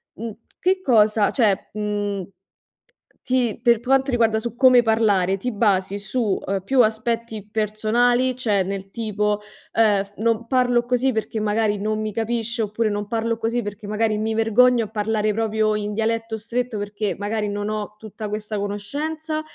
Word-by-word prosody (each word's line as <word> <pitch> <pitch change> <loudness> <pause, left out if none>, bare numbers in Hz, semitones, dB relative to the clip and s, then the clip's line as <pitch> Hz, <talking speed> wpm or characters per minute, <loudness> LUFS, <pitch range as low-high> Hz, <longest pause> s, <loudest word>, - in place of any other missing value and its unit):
mhmm, 225 +1 -5 0.3
che 375 +1 +1
cosa, 215 - +3
cioè, 215 -7 +1
mhmm, 205 -2 -2
t 195 - -16 0.9
ti 250 -4 0
per 235 -2 +4
quanto 265 +3 +2
riguarda 225 -3 +2 0.2
come 255 -2 +6
parlare, 210 -5 +2
ti 250 +6 -3
basi 200 -2 +1
su, 210 0 -1
uhm, 195 0 -1
più 260 +4 +4
aspetti 220 -1 -2
personali, 230 +4 +1
cioè 210 -6 +1
nel 195 0 -5
tipo, 210 -2 -1 0.3
ehm, 210 -3 +3
non 230 +1 0
parlo 245 -1 +2
così 250 +1 +1
perché 220 0 -3
magari 210 -1 +1
non 215 +1 -1
mi 215 -1 -3
capisce, 230 +1 -2
oppure 215 +1 -1
non 205 0 -3
parlo 230 +1 -1
così 230 +1 -1
perché 205 0 -7
magari 215 +1 0
mi 220 +1 -1
vergogno 230 +1 +4
a - - -14
parlare 215 0 0
proprio 215 0 +1
in 210 0 -3
dialetto 225 +1 -1
stretto 230 +1 -3
perché 205 0 -3
magari 210 +1 -2
non 205 +1 -3
ho 210 -1 -4
tutta 215 0 -7
questa 210 0 -4
conoscenza, 300 +11 -3
220 Hz, 160 wpm, -22 LUFS, 210-235 Hz, 0.9 s, come